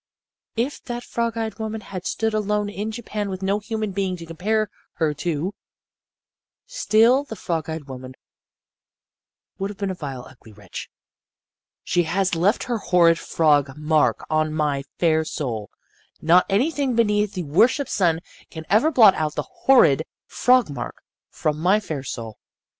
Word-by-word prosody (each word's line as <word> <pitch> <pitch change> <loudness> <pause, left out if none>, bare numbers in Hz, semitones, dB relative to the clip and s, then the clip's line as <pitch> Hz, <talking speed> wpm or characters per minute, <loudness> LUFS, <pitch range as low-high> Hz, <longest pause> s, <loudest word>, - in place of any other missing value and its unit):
"If 245 +5 -2
that 240 -1 -4
frog 235 -1 -2
eyed 220 -2 -3
woman 220 0 -4
had 185 -3 -6
stood 225 -1 -1
alone 210 -1 0
in 205 +1 -4
Japan 215 -2 -4
with 190 0 -5
no 200 +2 +1
human 215 -1 -3
being 190 -1 -2
to 170 - -9
compare 210 +7 0 0.3
her 155 -2 0
to 165 +4 -2 1.1
still 255 - +3
the 250 -6 -8
frog 165 -5 -3
eyed 160 -1 -4
woman 130 -1 -9 1.4
would 195 +1 -2
have 205 - -8
been 200 -1 -2
a - - -2
vile, 135 -7 -6
ugly 120 -4 -16
wretch. 100 -3 -9 0.9
"She 175 - +2
has 180 +3 0
left 185 +7 +2
her 240 -2 -2
horrid 170 -3 +4
frog 145 -3 +2
mark 150 0 +1
on 155 0 0
my 145 -3 0
fair 160 -2 +3
soul. 120 -9 -4 0.5
Not 170 +3 +4
anything 265 +5 +1
beneath 210 -2 +2
the 180 - -2
worshiped 230 - +2
sun 170 -4 +2 0.3
can 160 -1 -8
ever 220 +10 +5
blot 225 -10 +7
out 155 -1 -2
the - - -1 0.2
horrid 200 - +6 0.2
frog 250 0 +3
mark 140 - -5 0.3
from 150 -1 -2
my 185 +6 +3
fair 160 -9 -5
soul. 115 -4 -7
185 Hz, 155 wpm, -23 LUFS, 155-220 Hz, 1.4 s, blot